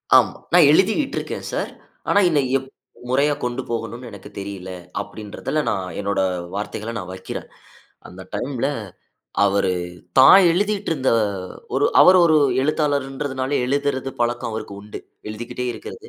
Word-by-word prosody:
ஆமா, - - +5 0.2
"நான் 175 -4 +8
எழுதிகிட்டு 215 - +2
இருக்கேன் - - -4
சார். - - -2 0.4
ஆனா 205 - +5
இத 155 -3 +2 0.2
எப் 135 0 -8 0.4
முறையா 140 +3 +3
கொண்டு 125 +1 -2
போகணும்னு 115 +1 -4
எனக்கு 100 -2 -11
தெரியல." 100 -2 -7 0.3
அப்படின்றதுல 110 +8 -4
நான் 95 -3 -2
என்னோட 100 0 -1 0.4
வார்த்தைகளை 105 +2 -4
நான் 90 -3 -6
வைக்கிறேன். 95 0 -7 0.6
அந்த 95 +1 -11
டைம்ல 135 0 -2 0.8
"அவரு, 100 -2 +2 0.5
தான் 135 +8 +9
எழுதிட்டு 205 +2 0
இருந்த 135 -4 0 0.6
ஒரு - - +3
அவரு 185 0 +8
ஒரு 155 -1 +4 0.3
எழுத்தாளர்ன்றதுனால 140 -2 -1
எழுதுறது 135 0 -1
பழக்கம் 120 0 0
அவருக்கு 110 -2 -6
உண்டு, 105 - -8 0.3
எழுதிக்கிட்டே 120 +3 -5
இருக்கிறது. 440 - -10
130 Hz, 130 wpm, -22 LUFS, 105-150 Hz, 0.8 s, தான்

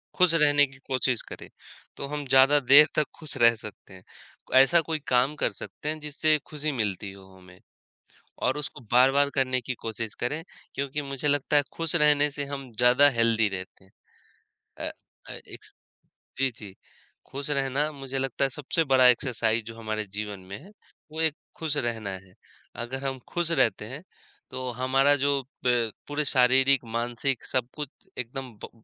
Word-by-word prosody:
खुश 180 -2 +4
रहने 145 -2 +4
की 135 0 -17
कोशिश 130 -2 0
करें, - - -10 0.5
तो - - -4
हम 145 0 -4
ज़्यादा 135 +2 +6
देर 140 +3 +7
तक 155 - +2
खुश 155 -3 -7
रह 115 -2 +5
सकते 105 -2 -12
हैं, 95 -1 -14 0.5
ऐसा 135 +6 +6
कोई 160 0 -3
काम 130 +4 +2
कर 120 - 0
सकते 150 +8 -7
हैं 155 - -3
जिससे 150 +1 +1
खुशी 150 0 -3
मिलती 105 -6 -3
हो 95 0 -14
हमें, 90 0 -17 0.8
और 130 +3 0
उसको 150 -3 -6
बार-बार 135 +3 +5
करने 130 -1 +1
की 130 - -4
कोशिश 110 -1 -5
करें, 150 +6 -2 0.3
क्योंकि 140 +1 -2
मुझे 140 0 -4
लगता 145 0 +2
है 145 - +4
खुश 165 0 0
रहने 150 -2 +4
से 145 0 -4
हम 135 -2 -7
ज़्यादा 125 +4 +6
हेल्दी 115 -3 +2
रहते 95 0 -8
हैं। 95 - -26 1.0
अ - - -6 0.4
अ, - - -7
एक्स - - -12 0.7
जी, 135 0 +2
जी, 100 -5 -11 0.5
खुश 140 +2 -5
रहना 140 +1 0
मुझे 135 -2 -6
लगता 135 0 -1
है - - 0
सबसे 150 +5 -1
बड़ा 130 -3 +4
एक्सरसाइज़ 115 -3 +1
जो 115 0 -9
हमारे 110 -1 -4
जीवन 105 -1 -5
में 95 +2 -9
है, 185 +8 -15 0.4
वो 160 +1 -3
एक 160 -2 +1 0.2
खुश 155 -2 -2
रहना 115 -6 -2
है। 95 -1 -9 0.5
अगर 130 +3 -6
हम 135 -1 -3
खुश 175 -1 0
रहते 120 -10 +1
हैं, 130 +8 -8 0.5
तो 130 0 -5
हमारा 135 +3 +3
जो 140 0 +1 0.2
प 120 -3 +2 0.2
पूरे 145 +1 -1
शारीरिक, 130 +1 +4
मानसिक 120 +3 -2
सब 125 -2 -1
कुछ 150 -3 -5 0.3
एकदम 130 +1 -5
ब - - -9
135 Hz, 175 wpm, -27 LUFS, 115-145 Hz, 1.0 s, देर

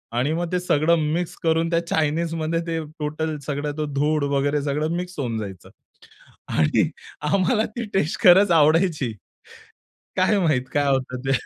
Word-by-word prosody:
आणि 130 +6 +1
मग 170 +1 -2
ते 180 - +1
सगळं 170 -1 +2 0.2
मिक्स 175 +1 -2
करून 165 0 +2
त्या 170 0 0
चायनीजमध्ये 160 +1 0
ते 165 -1 -1 0.2
टोटल 155 +1 -3
सगळं 145 0 -2
ती 155 - -1
धूळ 150 +2 +1
वगैरे 145 +1 +1
सगळं 150 +3 -1
मिक्स 180 -1 -6
होऊन 120 -5 -2
जायचं. 95 -4 -8 0.8
आणि 75 -2 +2 0.4
आम्हाला 210 +4 +2
ती 235 -2 -3
टेस्ट 160 -4 0
खरंच 190 0 +7
आवडायची. 155 - +3 1.0
काय 190 +3 +3
माहीत 155 -8 +1
काय 145 -1 +2
होतं 130 -2 -1
ते. 135 - +2
155 Hz, 150 wpm, -23 LUFS, 145-170 Hz, 1.0 s, खरंच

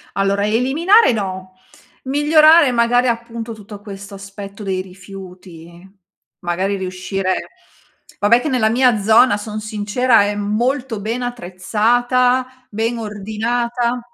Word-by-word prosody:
Allora, 200 +1 0
eliminare 285 - +3
no. 190 -3 -5 0.5
Migliorare 300 +2 +5
magari 245 +1 +2
appunto 230 -1 -4
tutto 210 -1 -12
questo 200 -1 -10
aspetto 200 +1 -10
dei 190 -2 -2
rifiuti, 185 -2 -13 0.5
magari 190 +3 -2
riuscire 185 0 -3 0.8
vabbè 230 +4 +4
che 310 - -3
nella 235 -4 +1
mia 245 -2 +3
zona, 220 +1 +4
son 215 +1 -6
sincera 215 +2 +1
è 205 0 -1
molto 230 +3 -2
ben 230 +4 -3
attrezzata, 245 +4 0
ben 225 +3 -2
ordinata. 235 +3 -2
220 Hz, 110 wpm, -18 LUFS, 195-245 Hz, 0.8 s, Migliorare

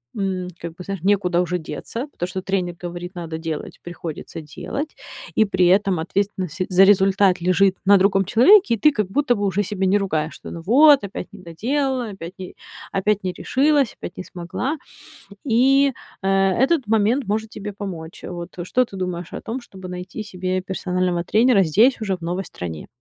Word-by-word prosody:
м, 190 -3 -2
как 170 -1 -6
бы, 180 - -9
знаешь, 195 -2 -5
некуда 185 -3 +2
уже 180 0 -1
деться, 230 - -6
потому 175 - -4
что 185 +1 -4
тренер 185 -2 -2
говорит: 175 +1 -6
"Надо 165 -2 -5
делать"- 160 -2 -5
приходится 165 -2 -7
делать. 275 - -6 0.4
И 220 - +5
при 185 -3 +2
этом 190 -2 +3
ответственность 185 -1 -2
за 185 0 +6
результат 195 -1 +4
лежит 185 +2 +3
на 200 0 +7
другом 195 0 +3
человеке, 255 - +6
и - - -8
ты 300 - +5
как 210 -7 -1
будто 245 +2 +2
бы 205 - -1
уже 200 +1 +1
себя 195 -1 -2
не 195 +2 +4
ругаешь, 160 -6 -1
что: - - -10
"Ну 165 - -7
вот, 280 +4 +6
опять 200 - -6
не 205 - -11
доделала, 250 - -1
опять 185 -3 -8
не 185 - -8 0.4
опять 205 +1 0
не 185 - -2
решилась, 275 - +2
опять 175 - -8
не 185 - -5
смогла". 180 - -4 0.7
И, 270 +3 +4 0.3
э, - - 0 0.3
этот 270 -4 +2
момент 225 +5 +2
может 220 +2 -1
тебе 205 -1 -7
помочь. 175 -5 -7
Вот 175 0 -6
что 250 +8 +1
ты 200 - -12
думаешь 180 -2 -4
о - - -5
том, 245 +3 -5
чтобы 190 -5 -11
найти 180 +4 -6
себе 185 -2 -3
персонального 180 -2 -1
тренера 225 -1 +4
здесь 220 - +4
уже, 195 -4 -1
в - - -29
новой 175 +3 -2
стране? 85 - -7
195 Hz, 185 wpm, -22 LUFS, 180-220 Hz, 0.7 s, на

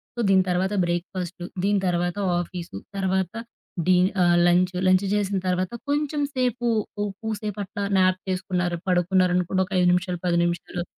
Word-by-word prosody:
So - - -7
దీని 190 -1 +5
తర్వాత 185 +3 0
breakfast, 175 +1 -4 0.2
దీని 205 0 +2
తర్వాత 175 +1 0 0.2
ఆఫీసు, 175 - -7 0.2
తర్వాత 190 -2 0 0.5
డీ 185 -1 +5 0.3
ఆహ్, 175 0 +4
లంచు. 180 +1 +2
లంచు 185 +2 +3
చేసిన 200 -1 0
తర్వాత 185 0 0 0.2
కొంచెం 295 0 0
సేపు, 250 -1 0 0.3
ఓ - - +1 0.2
కూసేపు 215 -2 -4
అట్లా 200 +1 -5 0.2
న్యాప్ 185 0 +3
చేసుకున్నారు, 180 -2 -1
పడుకున్నారనుకోండి 180 +1 +2
ఒక 195 - -9
5 180 - +4
నిమిషాలు, 180 -1 -1
10 170 -1 +2
నిమిషాలు. 175 0 -3
185 Hz, 150 wpm, -24 LUFS, 175-195 Hz, 0.5 s, దీని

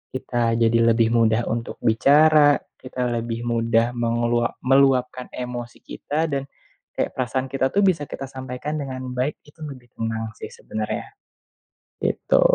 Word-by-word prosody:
kita 120 -3 0
jadi 115 0 +3 0.2
lebih 115 -1 +3
mudah 115 0 +3
untuk 115 +1 -3
bicara, 145 +5 +5 0.2
kita 125 -1 -3
lebih 115 0 -3
mudah 115 0 +1
melu 120 0 +1 0.2
meluapkan 130 -1 +3
emosi 120 -1 -6
kita, 155 +1 -3
dan 140 0 -2 0.5
kayak - - -1
perasaan 130 +1 -2
kita 135 -1 +1
tuh 205 - +4
bisa 165 -7 +2
kita - - -7
sampaikan 130 +3 -5
dengan 130 -2 -5
baik 125 +4 -1
itu 150 +2 -21
lebih 130 -5 -10
tenang 110 0 -3
sih - - -6
sebenernya, 110 - -5 0.9
gitu. - - +2
125 Hz, 140 wpm, -23 LUFS, 115-135 Hz, 0.9 s, bicara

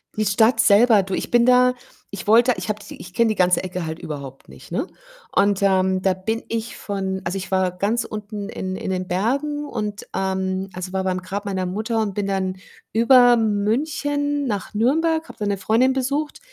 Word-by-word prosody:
Die 215 - 0
Stadt 220 +5 +3
selber 215 0 +5
du, 190 0 -6
ich - - -2
bin 240 -1 +5
da 250 0 +5 0.4
ich 200 -2 -7
wollte 235 +4 +5
ich 180 +1 -5
habe 215 0 -2
die - - -10
ich 180 - -11
kenne 235 +4 +3
die 215 - 0
ganze 180 -1 +2
Ecke 180 -2 -4
halt 160 0 -5
überhaupt 140 -3 -8
nicht, - - -14
ne, - - -1 0.5
und 200 -1 +3
ähm, 190 -1 +2
da 190 0 +2
bin 220 +5 -3
ich 230 0 -4
von 190 -2 -3
also, 175 +2 -2
ich 190 - -6
war 185 -1 +2
ganz 205 +6 -1
unten 210 -1 -6
in 185 0 -4
in - - -5
den 185 -1 -2
Bergen 280 +11 -1
und 210 -5 -5
ähm, 190 0 -1
also, 185 +1 -6
war 190 0 0
bei 190 - 0
meinem 185 - -4
Grab 200 +3 -5
meiner 190 -2 -2
Mutter 220 +5 -2
und 205 -2 -2
bin 205 - -1
dann 190 -1 -1 0.4
über 245 +1 +6
München 285 +7 0
nach 205 -4 -3
Nürnberg, 320 +9 +1
habe - - -12
da 210 - -3
'ne 200 -1 0
Freundin 225 +7 +2
besucht 280 +3 -2
205 Hz, 205 wpm, -22 LUFS, 190-235 Hz, 0.5 s, über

